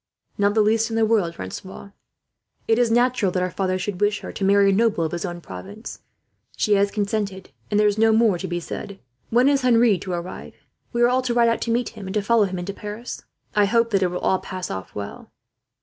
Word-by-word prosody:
"Not 205 Hz, +1 st, +1 dB
the 220 Hz, -, +5 dB
least 225 Hz, +2 st, +2 dB
in 225 Hz, -, -3 dB
the 225 Hz, 0 st, +3 dB
world, 205 Hz, -7 st, +1 dB
Francois. 190 Hz, -, -8 dB, 0.8 s
It 225 Hz, +1 st, +3 dB
is 240 Hz, -1 st, +3 dB
natural 240 Hz, -4 st, +2 dB
that 180 Hz, -, 0 dB
her 180 Hz, -, -2 dB
father 185 Hz, -1 st, -1 dB
should 185 Hz, 0 st, -4 dB
wish 205 Hz, 0 st, +1 dB
her -, -, -7 dB
to -, -, -5 dB
marry 200 Hz, 0 st, +5 dB
a -, -, +2 dB
noble 210 Hz, -4 st, +2 dB
of 160 Hz, -, -2 dB
his 175 Hz, +2 st, -3 dB
own 175 Hz, -1 st, -6 dB
province. 205 Hz, +6 st, -9 dB, 0.6 s
She 210 Hz, -, +2 dB
has 200 Hz, 0 st, +3 dB
consented, 200 Hz, -2 st, -3 dB, 0.2 s
and 210 Hz, -, +2 dB
there 210 Hz, -, +4 dB
is 210 Hz, 0 st, +2 dB
no 225 Hz, 0 st, +5 dB
more 220 Hz, -5 st, +3 dB
to 190 Hz, -, -4 dB
be 175 Hz, 0 st, -2 dB
said. 195 Hz, +3 st, -7 dB, 0.3 s
"When 245 Hz, +3 st, +4 dB
is 280 Hz, -1 st, +3 dB
Henri 235 Hz, -5 st, +4 dB
to 185 Hz, -, -5 dB
arrive? 175 Hz, +1 st, -6 dB, 0.4 s
We 240 Hz, -1 st, +1 dB
are -, -, +7 dB
all 255 Hz, +1 st, +2 dB
to 250 Hz, -2 st, -2 dB
ride 235 Hz, -1 st, +4 dB
out 230 Hz, -, -1 dB
to 230 Hz, -, -1 dB
meet 240 Hz, +1 st, 0 dB
him, 210 Hz, -4 st, -10 dB
and 190 Hz, -, -5 dB
to 210 Hz, -, +1 dB
follow 225 Hz, 0 st, +3 dB
him 185 Hz, -1 st, -4 dB
into 180 Hz, +3 st, -4 dB
Paris. 210 Hz, +4 st, -7 dB, 0.3 s
I 210 Hz, -1 st, +5 dB
hope 230 Hz, +3 st, +2 dB
that 195 Hz, -2 st, +2 dB
it 185 Hz, -, +3 dB
will 180 Hz, 0 st, -3 dB
all 190 Hz, +1 st, +1 dB
pass 185 Hz, -1 st, -6 dB
off 95 Hz, 0 st, -7 dB
well." 100 Hz, -1 st, -7 dB
205 Hz, 245 wpm, -23 LUFS, 190-230 Hz, 0.8 s, are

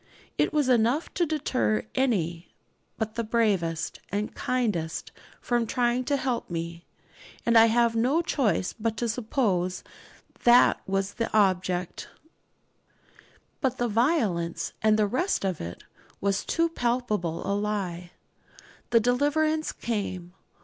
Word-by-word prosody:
It -, -, +1 dB
was 295 Hz, -3 st, +1 dB
enough 245 Hz, +5 st, +2 dB
to 345 Hz, -2 st, +1 dB
deter 265 Hz, -7 st, 0 dB
any 180 Hz, -10 st, 0 dB, 0.5 s
but 220 Hz, -1 st, -3 dB
the 230 Hz, -, -2 dB
bravest 195 Hz, -8 st, 0 dB
and 205 Hz, +2 st, -2 dB
kindliest 210 Hz, -11 st, -2 dB, 0.3 s
from 240 Hz, -2 st, 0 dB
trying 245 Hz, +1 st, +1 dB
to 285 Hz, +1 st, +1 dB
help 255 Hz, -3 st, -2 dB
me; 170 Hz, 0 st, -5 dB, 0.6 s
and 235 Hz, -, +3 dB
I 225 Hz, 0 st, +8 dB
have 235 Hz, 0 st, +2 dB
no 265 Hz, +9 st, +2 dB
choice 220 Hz, -, 0 dB
but 225 Hz, -1 st, -3 dB
to 240 Hz, -, -1 dB
suppose 210 Hz, -6 st, -1 dB, 0.6 s
that 240 Hz, +1 st, +6 dB
that -, -, -32 dB
was 195 Hz, 0 st, -1 dB
the 230 Hz, -, -3 dB
object. 185 Hz, -3 st, 0 dB, 1.5 s
But 260 Hz, -2 st, 0 dB
the 240 Hz, -, 0 dB
'violence,' 205 Hz, -, 0 dB
and 215 Hz, 0 st, +4 dB
the 215 Hz, -, +3 dB
rest 260 Hz, -, 0 dB
of 185 Hz, -4 st, -2 dB
it, 85 Hz, +1 st, -7 dB, 0.4 s
was 200 Hz, 0 st, 0 dB
too 335 Hz, 0 st, +1 dB
palpable 235 Hz, -, -1 dB
a 200 Hz, -, 0 dB
lie. 200 Hz, -4 st, -2 dB, 0.8 s
The 230 Hz, -, +5 dB
deliverance 295 Hz, +6 st, +1 dB
came. 185 Hz, -6 st, -4 dB
225 Hz, 130 wpm, -27 LUFS, 185-250 Hz, 1.5 s, I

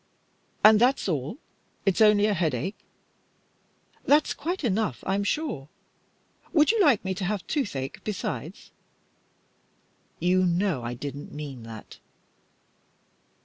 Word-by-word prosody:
"And 215 Hz, 0 st, +8 dB
that's 255 Hz, -1 st, +3 dB
all? 155 Hz, -, -2 dB, 0.5 s
It's 195 Hz, +1 st, +2 dB
only 210 Hz, -1 st, +6 dB
a 210 Hz, -, +2 dB
headache?" 170 Hz, -, -2 dB, 1.2 s
"That's 295 Hz, +2 st, +3 dB
quite 345 Hz, +3 st, -4 dB
enough, 210 Hz, -, -1 dB
I'm 195 Hz, +1 st, 0 dB
sure. 205 Hz, -, -2 dB, 0.8 s
Would 305 Hz, +2 st, +5 dB
you 455 Hz, -2 st, +2 dB
like 270 Hz, -, +4 dB
me 190 Hz, -, 0 dB
to 190 Hz, +1 st, -5 dB
have 195 Hz, -3 st, -2 dB
toothache 175 Hz, -, -3 dB
besides?" 210 Hz, -3 st, -5 dB, 1.5 s
"You 180 Hz, +2 st, +3 dB
know 175 Hz, -4 st, +1 dB
I 120 Hz, +1 st, -4 dB
didn't 140 Hz, +3 st, -7 dB
mean 145 Hz, -4 st, -7 dB
that." 110 Hz, -2 st, -11 dB
190 Hz, 115 wpm, -26 LUFS, 145-220 Hz, 1.5 s, And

